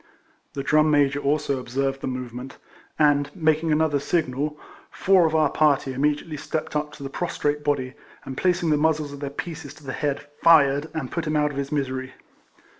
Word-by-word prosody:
The 140 - -4
Drum 155 +2 +4
Major 145 -1 +3
also 140 -1 0
observed 135 +2 -2
the - - -3
movement, 125 0 -6 0.4
and, 145 -2 +3
making 160 -2 +1
another 150 -1 +2
signal, 150 -1 -1 0.3
four 185 -3 +3
of 160 - -2
our 155 -2 +3
party 140 -3 +2
immedi 145 +3 0
ately 155 -3 -6
stepped 155 +1 -4
up 150 0 -1
to 140 - -10
the - - -3
prostrate 150 -3 -2
body, 135 -3 -1 0.3
and 130 - -6
placing 175 0 +1
the 150 - +4
muzzles 155 -1 +1
of 140 - -9
their 140 -1 -4
pieces 150 -1 -7
to 155 - -17
the 135 -1 -5
head, 145 0 -2 0.2
fired, 145 -2 +5
and 145 -5 -4
put 170 -2 -3
him 155 - 0
out 150 -1 +2
of 140 - -8
his 140 +1 -3
misery. 130 -3 -2
145 Hz, 190 wpm, -24 LUFS, 135-155 Hz, 0.4 s, fired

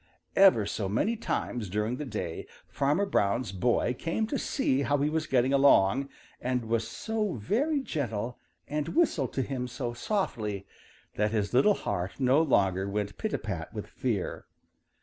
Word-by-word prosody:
Ever 190 - +6
so 100 -1 -2
many 205 - +1
times 120 - -3
during 105 +5 -1
the 150 - -4
day 85 -9 -4 0.2
Farmer 150 +8 +1
Brown's 115 - +1
boy 120 +5 +1
came 165 - -1
to 270 +5 -2
see 140 - +1
how 140 +2 +2
he 145 +2 +1
was 155 -1 -1
getting 130 +1 +2
along, 135 -2 +4 0.3
and 125 -1 -1
was 115 0 0
so 210 - -2
very 260 - 0
gentle 120 - -3 0.3
and 150 - -3
whistled 170 - +2
to 135 - 0
him 125 -1 -3
so 120 -1 -4
softly 110 - -2 0.5
that 105 +1 +2
his 105 -1 -1
little 195 +12 +5
heart 90 +6 -3
no 135 +3 +4
longer 95 - +2
went 100 0 -3
pita - - -1
pat - - -5
with - - -4
fear. - - -3
125 Hz, 160 wpm, -29 LUFS, 105-155 Hz, 0.5 s, Ever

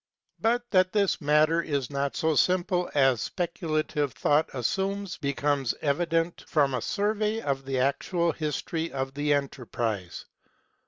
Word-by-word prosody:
But 240 +2 +1
that 185 -1 +3
this 200 -4 +1
matter 155 +3 +3
is 140 -6 -2
not 140 0 -1
so 160 0 +1
simple 180 +2 +2
as 135 -4 +4
Speculative 155 -5 -2
Thought 150 +2 +2
assumes 195 - -1
becomes 140 -2 0
evi 155 +4 +1
dent 165 +1 0
from 140 -4 +2
a 125 - -1
survey 210 - 0
of 135 -8 -2
the 135 -1 -2
actual 165 +6 +1
history 160 +1 -3
of 135 0 -3
the 145 +1 -1
enterprise. 115 -8 -3
150 Hz, 140 wpm, -27 LUFS, 140-175 Hz, -, as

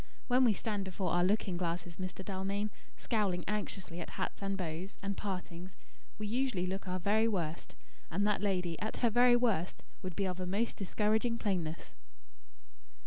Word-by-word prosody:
When 255 0 +5
we 225 - +6
stand 205 -1 -2
before 190 -2 -2
our 175 0 +4
looking 190 -1 +2
glasses, 170 -1 -2
Mr. 185 0 -5
Dalmain, 200 +2 -1 0.3
scowling 195 -6 +1
anxiously 195 -4 -2
at - - -5
hats - - -3
and 195 0 -1
bows, 175 +2 -4
and 200 0 -1
partings, 185 -2 -5 0.4
we 215 - -3
usually 235 -4 +1
look 190 +1 -3
our 180 0 0
very 215 +5 +3
worst; 170 -7 -2 0.3
and 200 +5 +1
that 210 -2 +2
lady, 180 -5 0
at 220 - -2
her 230 - +4
very 245 +2 +7
worst, 220 -8 +1 0.2
would 185 -2 -4
be 200 - +1
of 185 -1 -2
a 185 - -2
most 210 +6 0
discouraging 215 +4 +1
plainness." 175 -7 -2
195 Hz, 170 wpm, -34 LUFS, 180-210 Hz, 0.4 s, very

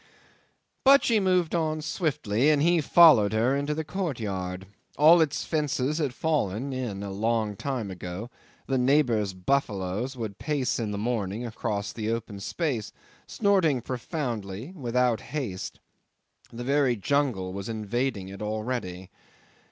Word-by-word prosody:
'But 275 +1 +7
she 225 -3 +3
moved 185 -4 +2
on 155 -2 0
swiftly, 150 - 0
and 150 -2 +4
he 170 0 +4
followed 145 - +6
her 120 +5 +2
into 145 +2 -1
the 160 - -2
courtyard. 105 - -3 0.3
All 165 +3 +7
its 155 -3 0
fences 150 -1 0
had 145 -5 0
fallen 135 -4 -1
in 115 -6 -4
a 100 - -5
long 110 +1 0
time 120 -3 -3
ago; 90 +6 -7 0.3
the 135 -1 0
neighbours' 125 -7 +2
buffaloes 105 +2 -1
would 110 -4 -5
pace 145 -5 -1
in 110 -2 -2
the 105 - -3
morning 110 0 -2
across 105 -2 -3
the 110 -1 -3
open 115 -3 -3
space, 125 - -2 0.4
snorting 190 - +2
profoundly, 120 - -4
without 125 - +1
haste; 120 -12 -5 0.7
the 120 +1 -6
very 135 -1 +2
jungle 115 -6 0
was 100 +2 -5
invading 110 -1 -2
it 95 +1 -9
already. 105 -4 -4
120 Hz, 135 wpm, -27 LUFS, 105-150 Hz, 0.7 s, But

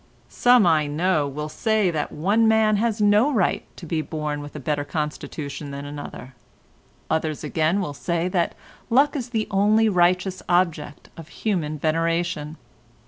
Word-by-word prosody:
Some 245 -4 +4
I 155 -3 +3
know, 155 0 +1
will 150 +2 -5
say 205 +5 +1
that 150 -3 -3
one 205 +8 +2
man 220 -1 +4
has 225 0 0
no 210 +7 +4
right 210 -9 +1
to 175 - -9
be 160 -1 -1
born 150 -2 -4
with 145 +1 -10
a - - -5
better 145 +1 -1
constitution 150 -1 -5
than 140 0 -6
another; 145 -3 -8 0.7
others 155 -2 -1
again 160 +4 +1
will 175 -7 -3
say 170 +4 -2
that 180 -2 0 0.3
luck 275 +6 +3
is 255 -4 -4
the 220 -3 -1
only 210 +3 +3
righteous 185 0 +2
object 175 -5 0
of 165 -2 -10
human 170 -6 -2
veneration. 165 0 -1
170 Hz, 155 wpm, -23 LUFS, 150-205 Hz, 0.7 s, Some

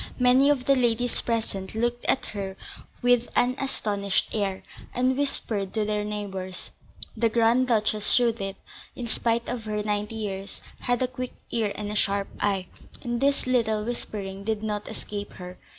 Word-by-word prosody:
Many 255 +2 +6
of 270 -4 +2
the 275 - +5
ladies 245 -1 +2
present 220 -4 -2
looked 240 +2 0
at - - +2
her 195 -2 -5 0.5
with 245 -1 +4
an 250 +1 +4
astonished 205 -7 0
air, 200 -3 -1 0.3
and 255 +1 +3
whispered 225 -8 -1
to 215 -1 +2
their 210 0 0
neighbours. 195 -3 -4 0.4
The 230 0 +3
Grand 235 +3 +4
Duchess 215 -2 +3
Judith, 230 -5 +2 0.4
in 245 - -4
spite 230 +1 0
of 240 -3 -3
her 210 -1 -1
ninety 210 +1 -1
years, 200 -3 -4 0.2
had 245 0 +1
a - - +2
quick 255 0 -5 0.2
ear 220 -3 +1
and 210 0 -3
a - - -3
sharp 200 -1 +1
eye, 195 -2 +1 0.4
and 240 0 -1
this 280 0 +2
little 220 -4 +2
whispering 200 -5 -4
did 220 0 -1
not 210 -1 -2
escape 205 0 -6
her. 180 0 -9
220 Hz, 165 wpm, -27 LUFS, 205-245 Hz, 0.5 s, Many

